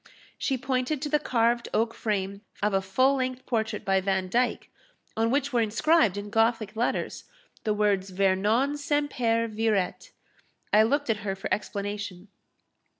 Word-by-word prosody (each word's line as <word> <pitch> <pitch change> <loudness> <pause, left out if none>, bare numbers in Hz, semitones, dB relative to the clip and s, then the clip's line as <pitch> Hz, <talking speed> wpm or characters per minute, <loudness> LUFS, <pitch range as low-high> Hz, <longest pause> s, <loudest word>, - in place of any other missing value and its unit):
She 270 - -1
pointed 260 +3 -1
to 295 - -2
the 300 +1 +3
carved 235 -2 +1
oak 225 +1 +1
frame 200 -2 -2 0.2
of 210 -1 +2
a 195 - +2
full 260 +8 +2
length 255 0 -3
portrait 220 -3 -2
by 195 -1 +2
Vandyke, 195 +6 0 0.4
on 225 +1 +1
which 280 +2 0
were 240 - +3
inscribed, 225 - +3
in 205 0 -6
Gothic 225 -1 +1
letters, 235 +2 -2 0.4
the 215 - +2
words 200 -2 +1
Vernon 200 +9 +2
semper 275 -6 0
viret. 215 - -1 0.6
I 210 - +7
looked 280 +3 +2
at 220 - 0
her 200 -2 -3
for 195 - -3
explanation. 205 -2 -4
225 Hz, 150 wpm, -27 LUFS, 200-255 Hz, 0.6 s, I